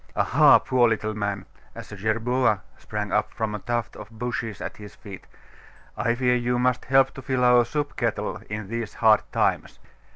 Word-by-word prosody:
Aha, -, -, +5 dB
poor 125 Hz, -2 st, +2 dB
little 110 Hz, -1 st, -1 dB
man!' 100 Hz, -2 st, -3 dB, 0.3 s
as -, -, -10 dB
a -, -, -7 dB
jerboa 110 Hz, +1 st, 0 dB
sprang 105 Hz, -2 st, -5 dB
up 105 Hz, 0 st, 0 dB
from 110 Hz, -1 st, -2 dB
a 105 Hz, -, -4 dB
tuft 120 Hz, 0 st, -3 dB
of 105 Hz, 0 st, -10 dB
bushes 115 Hz, -2 st, -4 dB
at -, -, -6 dB
his 105 Hz, 0 st, -11 dB
feet 100 Hz, -3 st, -11 dB, 0.7 s
'I 115 Hz, -, 0 dB
fear 125 Hz, 0 st, +2 dB
you 125 Hz, 0 st, 0 dB
must 125 Hz, 0 st, 0 dB
help 135 Hz, +1 st, +4 dB
to 135 Hz, -, -9 dB
fill 130 Hz, -1 st, -1 dB
our 125 Hz, 0 st, +6 dB
soup 145 Hz, +5 st, -3 dB
kettle 110 Hz, -3 st, -2 dB
in 105 Hz, -1 st, -5 dB
these 115 Hz, 0 st, -5 dB
hard 110 Hz, -2 st, +4 dB
times. -, -, 0 dB
115 Hz, 185 wpm, -24 LUFS, 105-125 Hz, 0.7 s, our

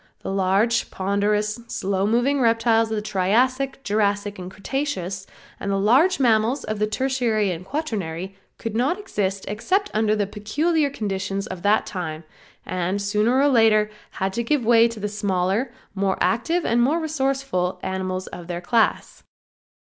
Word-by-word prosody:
The -, -, -4 dB
large, 195 Hz, +5 st, +2 dB
ponderous, 210 Hz, +3 st, 0 dB
slow 195 Hz, -3 st, -1 dB
moving 250 Hz, +5 st, +2 dB
reptiles 230 Hz, -1 st, +3 dB
of 220 Hz, -, -1 dB
the 210 Hz, -, -2 dB
Triassic, 255 Hz, +8 st, +1 dB
Jurassic 205 Hz, -2 st, 0 dB
and 180 Hz, 0 st, -6 dB
the -, -, -15 dB
Cretaceous, 195 Hz, -6 st, -3 dB, 0.3 s
and 200 Hz, -, -4 dB
the 195 Hz, -, +1 dB
large 265 Hz, -, +4 dB
mammals 235 Hz, +1 st, +2 dB
of 215 Hz, -1 st, -4 dB
the 215 Hz, -, +2 dB
Tertiary 230 Hz, -4 st, 0 dB
and 175 Hz, 0 st, -5 dB
Quarternary 195 Hz, -, -4 dB, 0.2 s
could 225 Hz, -1 st, -5 dB
not 265 Hz, -, +1 dB
exist 200 Hz, -, -2 dB
except 370 Hz, -, 0 dB
under 215 Hz, 0 st, +2 dB
the 210 Hz, -1 st, 0 dB
peculiar 285 Hz, -, 0 dB
conditions 195 Hz, -5 st, -3 dB
of 185 Hz, -4 st, -7 dB
that 205 Hz, +3 st, +3 dB
time, 165 Hz, -5 st, -5 dB, 0.4 s
and 185 Hz, +2 st, -1 dB
sooner 210 Hz, +5 st, +2 dB
or 280 Hz, -, +4 dB
later 220 Hz, -5 st, +4 dB, 0.2 s
had 190 Hz, 0 st, -2 dB
to 235 Hz, -, -1 dB
give 255 Hz, 0 st, 0 dB
way 230 Hz, 0 st, +6 dB
to 230 Hz, -2 st, -7 dB
the 210 Hz, -, -2 dB
smaller, 205 Hz, +3 st, -1 dB, 0.2 s
more 195 Hz, -1 st, 0 dB
active 325 Hz, +10 st, +1 dB
and 235 Hz, +1 st, +2 dB
more 290 Hz, +7 st, +2 dB
resourceful 270 Hz, -, -1 dB
animals 185 Hz, 0 st, -3 dB
of 175 Hz, -1 st, -9 dB
their 175 Hz, -1 st, -3 dB
class. 225 Hz, +5 st, +1 dB
215 Hz, 160 wpm, -23 LUFS, 195-245 Hz, 0.4 s, way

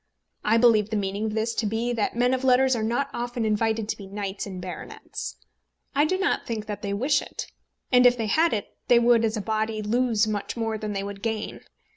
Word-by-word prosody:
I 220 Hz, +2 st, +3 dB
believe 225 Hz, -3 st, +5 dB
the 220 Hz, -, -2 dB
meaning 200 Hz, +1 st, -1 dB
of 215 Hz, -, -2 dB
this 225 Hz, +1 st, 0 dB
to 220 Hz, -, -1 dB
be 230 Hz, +3 st, -1 dB
that 225 Hz, -2 st, -1 dB
men 245 Hz, +2 st, +2 dB
of 260 Hz, 0 st, -1 dB
letters 260 Hz, 0 st, +4 dB
are 230 Hz, -, -2 dB
not 240 Hz, +6 st, 0 dB
often 240 Hz, -1 st, -2 dB
invited 220 Hz, 0 st, +1 dB
to -, -, -2 dB
be 200 Hz, -, -9 dB
knights 200 Hz, 0 st, -4 dB
and 185 Hz, -2 st, -6 dB
baronets. 175 Hz, -, -7 dB, 0.6 s
I 290 Hz, +2 st, +3 dB
do 370 Hz, +4 st, +1 dB
not 390 Hz, +2 st, 0 dB
think 220 Hz, -2 st, -3 dB
that 210 Hz, -1 st, -5 dB
they 200 Hz, -2 st, -3 dB
wish 265 Hz, +9 st, +2 dB
it; -, -, -6 dB, 0.5 s
and 250 Hz, -1 st, +7 dB
if 245 Hz, 0 st, +3 dB
they 225 Hz, -, -1 dB
had 320 Hz, +10 st, +3 dB
it 210 Hz, -2 st, -3 dB
they 240 Hz, -, +6 dB
would, 235 Hz, -1 st, +4 dB
as 220 Hz, 0 st, 0 dB
a -, -, -2 dB
body, 220 Hz, +1 st, -1 dB
lose 230 Hz, 0 st, +2 dB
much 210 Hz, +2 st, -3 dB
more 225 Hz, -1 st, -1 dB
than 210 Hz, -1 st, -3 dB
they 195 Hz, 0 st, -2 dB
would 200 Hz, 0 st, -7 dB
gain. 220 Hz, -1 st, -3 dB
220 Hz, 230 wpm, -25 LUFS, 210-245 Hz, 0.6 s, and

